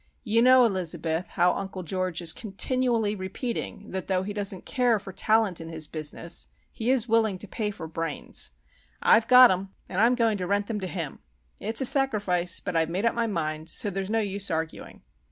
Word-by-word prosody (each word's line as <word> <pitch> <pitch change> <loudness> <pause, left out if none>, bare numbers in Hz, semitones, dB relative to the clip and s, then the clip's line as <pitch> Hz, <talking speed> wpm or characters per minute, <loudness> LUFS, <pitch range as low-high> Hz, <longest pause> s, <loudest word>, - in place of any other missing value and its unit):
"You 230 0 +2
know, 255 0 +7
Elizabeth, 175 -4 -1
how 180 0 +2
Uncle 190 -1 -5
George 180 0 -2
is 165 - +2
continually 230 0 -1
repeating 205 +2 -5
that 190 -2 -4
though 185 -1 +1
he 205 +2 -4
doesn't 200 -2 -2
care 245 -4 +2
for 195 -1 -9
talent 210 -2 +2
in 165 - -8
his 160 -1 -4
business 155 +2 -3 0.2
he 230 +2 -3
is 255 -3 +2
willing 220 -4 +2
to 205 - -7
pay 210 +2 -2
for 180 -5 -7
'brains.' 165 - -3 0.5
I've 225 0 +5
got 255 -2 +9
'em, 190 +1 -2 0.2
and 190 - -1
I'm 240 +2 +5
going 225 -4 +1
to 180 - -3
rent 200 +1 +1
them 210 -1 -3
to 190 - -4
him! 170 -6 -5 0.4
It's 225 +4 -1
a - - +1
sacrifice, 205 -10 +2
but 180 -3 -5
I've 160 0 +2
made 185 +6 -1
up 230 - +3
my 235 -1 0
mind, 155 -4 -3
so 205 - -1
there's 195 +1 -3
no 225 +1 +1
use 200 -1 -2
arguing." 160 0 -4
195 Hz, 200 wpm, -26 LUFS, 180-225 Hz, 0.5 s, got